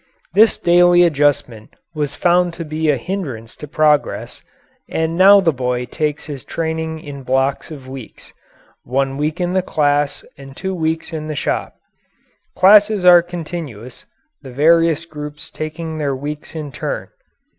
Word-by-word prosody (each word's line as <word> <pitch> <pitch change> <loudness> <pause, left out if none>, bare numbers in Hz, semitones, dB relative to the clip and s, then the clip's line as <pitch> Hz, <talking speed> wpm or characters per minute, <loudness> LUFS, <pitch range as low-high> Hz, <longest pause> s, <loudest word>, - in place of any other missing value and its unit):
This 215 +4 +5
daily 175 0 +5
adjustment 145 -8 0 0.2
was 145 -2 -3
found 175 -1 +2
to 165 -1 -6
be 155 +1 -1
a 145 - +3
hindrance 130 - -6
to 150 - -9
progress, 150 0 0 0.5
and 160 0 -1
now 195 +3 +7
the 165 -4 +2
boy 125 -1 -2
takes 150 +4 -3
his 140 -4 -7
training 160 -1 -3
in 140 -2 -9
blocks 135 +1 -1
of 140 -5 -10
weeks 130 -3 -11 0.5
one 135 +2 -1
week 150 +4 -2
in 180 0 -1
the 185 - +2
class 145 -4 0
and 135 0 -12
two 190 0 -3
weeks 160 -2 -2
in 155 -1 -5
the 155 - -4
shop. - - -2 0.8
Classes 205 0 +5
are 175 -1 +8
continuous, 160 -9 -8 0.3
the 135 - -10
various 165 +4 +3
groups 150 -2 -9
taking 155 0 -5
their 140 -3 -1
weeks 150 +4 -7
in 150 -3 -5
turn. - - -5
155 Hz, 150 wpm, -18 LUFS, 140-170 Hz, 0.8 s, are